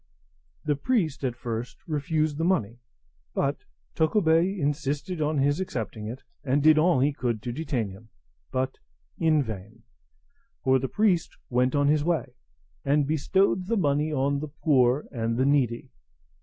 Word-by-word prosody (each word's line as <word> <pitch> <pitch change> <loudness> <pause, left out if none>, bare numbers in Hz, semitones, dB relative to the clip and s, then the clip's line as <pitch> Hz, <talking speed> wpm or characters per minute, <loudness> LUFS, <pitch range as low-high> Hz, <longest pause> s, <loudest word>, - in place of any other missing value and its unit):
The 150 -1 +2
priest 165 - 0
at 125 -3 -1
first 120 0 -5
refused 155 0 -1
the - - 0
money; 120 - 0 0.6
but - - -1 0.3
Tokubei 170 +2 +2
insisted 150 +2 -2
on 150 0 +1
his 145 +3 +2
accepting 110 - -4
it, 120 +4 -7 0.2
and 140 +1 +1
did 155 0 +6
all 165 -3 +4
he 145 +2 +2
could 120 -5 -2
to 120 - -3
detain 130 -6 -2
him, 105 +4 -13 0.4
but 130 +1 -2 0.4
in 155 -3 +3
vain; 110 0 -8 0.8
for 130 0 +4
the 130 0 -3
priest 200 -6 +1
went 125 +2 +2
on 145 0 +3
his 150 0 +3
way, 170 0 -1 0.5
and 145 +1 +2
bestowed 180 +5 +1
the 230 +1 +1
money 150 -3 +1
on 140 0 +1
the 155 - -4
poor 140 -3 +2
and 115 -2 -2
needy. 130 -3 +1
145 Hz, 150 wpm, -26 LUFS, 125-155 Hz, 0.8 s, did